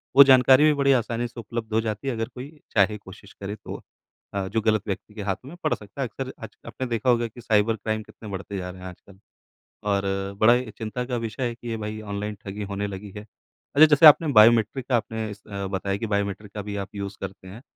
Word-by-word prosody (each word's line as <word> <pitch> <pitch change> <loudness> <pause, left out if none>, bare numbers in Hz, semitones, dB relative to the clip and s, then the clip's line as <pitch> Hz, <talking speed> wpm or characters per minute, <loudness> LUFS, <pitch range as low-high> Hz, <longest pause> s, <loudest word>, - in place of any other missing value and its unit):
वो 140 - +11
जानकारी 130 +1 +6
भी 155 - +5
बड़ी 140 -1 +3
आसानी 120 +1 -3
से 120 - -11
उपलब्ध 115 0 -5
हो 110 - +3
जाती 110 +3 -4
है 135 - 0
अगर 115 0 -2
कोई 145 +5 -9 0.2
चाहे 105 0 +3
कोशिश 100 +1 -14
करे 100 +2 -4
तो - - -8 0.5
अ, 100 -1 -2
जो 110 +3 -1
गलत 110 -2 +2
व्यक्ति 100 +2 -5
के 105 - -7
हाथों 100 +6 -3
में 175 - -11
पड़ 155 - +2
सकता 105 +6 -9
है। 130 - 0
अक्सर 130 +4 -6
आज - - -9
आपने 130 - -4
देखा 115 +1 0
होगा 120 -1 +3
कि 120 +2 -13
साइबर 110 -1 +2
क्राइम 110 +1 -3
कितने 105 0 -12
बढ़ते 100 +1 -5
जा 90 -1 -4
रहे 90 0 -10
हैं 95 - -7
आजकल। 95 +2 -16 0.7
और 100 -1 +2 0.4
बड़ा 110 +2 +7
ही 125 -2 -2
चिंता 115 +3 -3
का 125 -1 -3
विषय 115 +3 -5
है 120 - -5
कि 120 0 -10
ये 115 - -2
भई 105 +1 -5
ऑनलाइन 105 0 -4
ठगी 100 +1 -5
होने 100 +1 -3
लगी 100 0 -7
है। 105 +1 -8
अच्छा 140 +7 +1
जैसे 150 +1 +6
आपने 155 +2 +8
बायोमेट्रिक 115 +2 +5
का 125 - +3
आपने 110 -1 -3
इस 100 0 -10
अ, 100 -2 -5
बताया 100 0 -2
कि 115 - -3
बायोमेट्रिक 100 0 -2
का 105 - -4
भी 100 0 -5
आप 95 - -8
यूज़ 100 0 -5
करते 95 -1 -7
हैं। 110 +7 -11
110 Hz, 245 wpm, -25 LUFS, 100-120 Hz, 0.7 s, वो